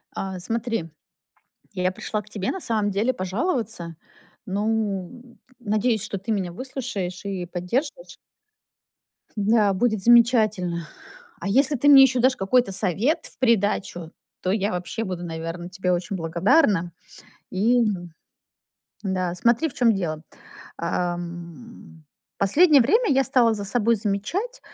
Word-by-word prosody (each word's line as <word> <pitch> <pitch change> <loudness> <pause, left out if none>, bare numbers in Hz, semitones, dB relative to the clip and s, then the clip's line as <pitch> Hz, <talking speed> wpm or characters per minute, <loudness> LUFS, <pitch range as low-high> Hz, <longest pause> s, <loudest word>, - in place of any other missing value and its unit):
А, 190 -1 -4
смотри. 225 -3 -3 0.8
Я 185 -1 0
пришла 210 +3 -4
к - - -19
тебе, 200 -2 -3
на 380 - -5
самом 215 -6 0
деле, 210 +6 0
пожаловаться. 205 - -3 0.5
Ну, 215 +3 -3 0.2
надеюсь, 215 0 0
что 200 - -4
ты 195 +4 -5
меня 190 -5 -1
выслушаешь 200 -5 -5
и 190 -3 -3
поддержишь. 240 - -4 1.2
Да, 210 0 +3
будет 215 +1 0
замечательно. 215 -7 +3 0.5
А - - -4
если 275 +7 +3
ты 285 +4 +2
мне 275 -2 +10
ещё 260 -2 +4
дашь 260 +2 +3
какой-то 195 +2 +1
совет 205 - 0
в - - -12
придачу, 205 -8 0 0.3
то 185 - 0
я 200 +1 0
вообще 180 +5 -4
буду, 180 -3 -5
наверно, 165 +1 -5
тебе 185 0 -1
очень 180 +2 -2
благодарна. 175 - +2 0.6
И 235 +6 +3 1.2
Да, 185 -2 -1
смотри, 235 - +2
в - - -11
чём 230 -3 +3
дело. 160 -5 -3 0.5
А, 175 +1 -1
м, 175 +1 -10 0.3
последнее 290 - +5
время 440 - +2
я 270 0 +4
стала 240 -4 +3
за 205 - -5
собой 230 +3 +2
замечать, 230 - -3
205 Hz, 130 wpm, -24 LUFS, 180-240 Hz, 1.2 s, мне